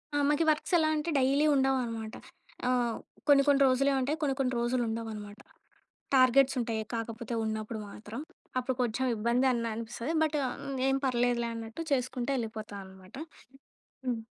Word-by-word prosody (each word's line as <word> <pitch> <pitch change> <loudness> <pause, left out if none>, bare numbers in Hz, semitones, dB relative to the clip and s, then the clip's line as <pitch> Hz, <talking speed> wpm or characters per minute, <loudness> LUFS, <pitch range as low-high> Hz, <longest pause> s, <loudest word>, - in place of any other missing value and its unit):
ఆహ్, 290 - +3
మాకు 295 +2 +2
ఈ - - 0
వర్క్స్ 310 +4 0
ఎలా 315 -1 +3
అంటే 305 +2 -2
డైలీ 275 +3 +3
ఉండవనమాట. 245 -5 0 0.5
ఆహ్, 245 -2 +1 0.3
కొన్ని 280 -1 +7
కొన్ని 280 -1 +5
రోజులు 275 +2 +3
ఉంటాయి, 295 +5 0
కొన్ని 280 -3 +1
కొన్ని 255 -1 +1
రోజులు 240 +1 +1
ఉండవనమాట. 220 -2 -5 0.8
టార్గెట్స్ 260 +1 +5
ఉంటాయి. 225 -2 -1
కాకపోతే 230 0 -4
ఉన్నప్పుడు 220 0 -3
మాత్రం, 215 +4 -8 0.4
అప్పుడు 255 +1 -2
కొంచెం 245 +2 0
ఇబ్బంది 235 +4 +2
అన్న 230 -2 -1
అనిపిస్తది. 230 +6 -4
బట్టా, 300 -2 +1 0.5
ఏం 270 - +3
పర్లేదులే 240 -2 +1
అన్నట్టు 225 +6 -6
చేసుకుంటే 255 0 -1
వెళ్ళిపోతా 220 -3 -5
అనమాట. 190 -1 -14 0.9
హ్మ్. 240 -3 -1
245 Hz, 145 wpm, -30 LUFS, 225-270 Hz, 0.9 s, కొన్ని